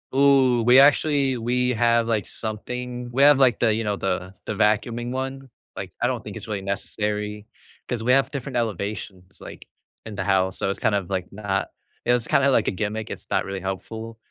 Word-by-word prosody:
Ooh, 135 -3 +4
we 125 +2 +7
actually 140 -2 +4
we 125 +2 0
have, 115 0 +2
like, 110 -4 0
something 125 +3 -5
we 135 +3 +3
have 145 -1 +7
like 130 -3 +4
the, 110 -2 +3
you 115 +1 -1
know, 105 -1 -1
the 95 0 -2
the - - -3
vacuuming 115 +4 0
one, 135 0 -4 0.3
like - - -6
I - - +3
don't - - -2
think - - -7
it's 110 - -9
really 105 -2 -3
necessary 105 +1 -3 0.4
'cause 120 -3 -3
we 125 +2 +3
have 135 +1 +3
different 140 -2 -5
elevations, 100 -3 -4
like, - - -11 0.4
in 110 - -7
the 95 - -2
house, 95 -1 +1
so - - -1
it's 100 - -3
kind 105 - +2
of 95 -3 -2
like 95 -2 -2
not 100 -1 -2 0.4
it's 120 -1 +2
kinda 140 0 +3
like - - +3
a - - -2
gimmick, 105 +3 -3
it's - - -8
not - - +1
really 95 -1 -5
helpful, 110 +4 -6
115 Hz, 200 wpm, -24 LUFS, 100-125 Hz, 0.4 s, we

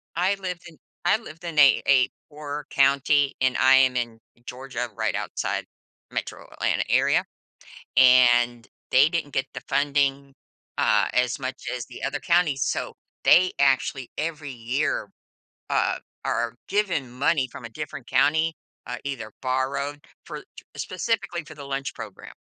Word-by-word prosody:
I 185 +4 +2
lived 180 -3 -6
in 160 - -15 0.3
I 180 - +4
lived 165 -7 -12
in 170 -2 -6
a 140 -2 +7
a 130 -2 +5 0.2
poor 150 0 -6
county, 140 +1 +3
and 130 -1 +2
I 130 +1 +6
am 130 -1 +4
in 120 -2 -2 0.3
Georgia 125 -1 -5
right - - -1
outside - - -3 0.5
Metro - - -5
Atlanta - - 0
area, - - +3 0.7
and 120 -2 +5 0.2
they 135 +4 +6
didn't 165 -4 -2
get 135 +1 0
the 130 - -5
funding, 140 -1 +1 0.4
uh, 105 -1 +3
as 125 0 +1
much 130 -1 -6
as 120 -2 -5
the 125 - -11
other 140 +1 -2
counties, 170 -6 +2
so - - -2 0.3
they 185 +1 +6
actually, 135 -1 +1
every 155 -2 -3
year, 120 -2 -1 0.6
uh, - - +1 0.3
are 120 0 -1
given 185 -10 0
money 140 +1 +1
from - - -10
a - - -7
different 135 0 -7
county, 160 +2 +2 0.3
uh, - - -5
either 125 -6 -5
borrowed 140 +3 -2 0.2
for - - -7 0.3
specifically 190 -7 -2
for 155 - -12
the 145 - -9
lunch 135 0 -3
program. - - -9
140 Hz, 145 wpm, -25 LUFS, 130-155 Hz, 0.7 s, a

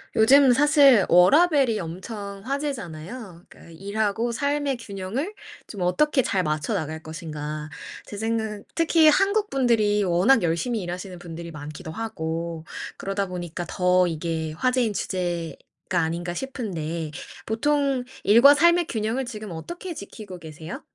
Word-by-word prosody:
요즘 260 +4 +6
사실 275 - +6
워라밸이 270 - +5
엄청 200 +4 -7
화제잖아요. 225 - -5
그니까 - - -16
'일하고 205 +6 -1
삶의 280 +2 -1
균형을 230 - -4 0.3
좀 200 - -8
어떻게 265 - +2
잘 190 -4 0
맞춰 155 +7 -1
나갈 160 -4 -3
것인가.' 155 -2 -6 0.4
제 - - -9
생각은 220 -1 -2
특히 330 -1 +5
한국 400 +6 +2
분들이 220 -6 +2
워낙 190 +7 +4
열심히 175 +8 0
일하시는 180 +1 -6
분들이 170 -1 -8
많기도 155 +2 -8
하고 165 -6 -4 0.3
그러다 195 0 -2
보니까 175 -1 -5
더 180 0 +3
이게 160 -1 -3
화제인 250 +4 +1
주제가 175 -4 -3 0.4
아닌가 170 +2 -2
싶은데 170 - -4 0.3
보통 275 +3 +1 0.2
일과 235 +7 +8
삶의 340 +3 +4
균형을 225 +4 -2
지금 215 -4 -7
어떻게 345 - -6
지키고 200 - -9
계세요? 160 0 -8
200 Hz, 305 characters per minute, -24 LUFS, 170-255 Hz, 0.4 s, 일과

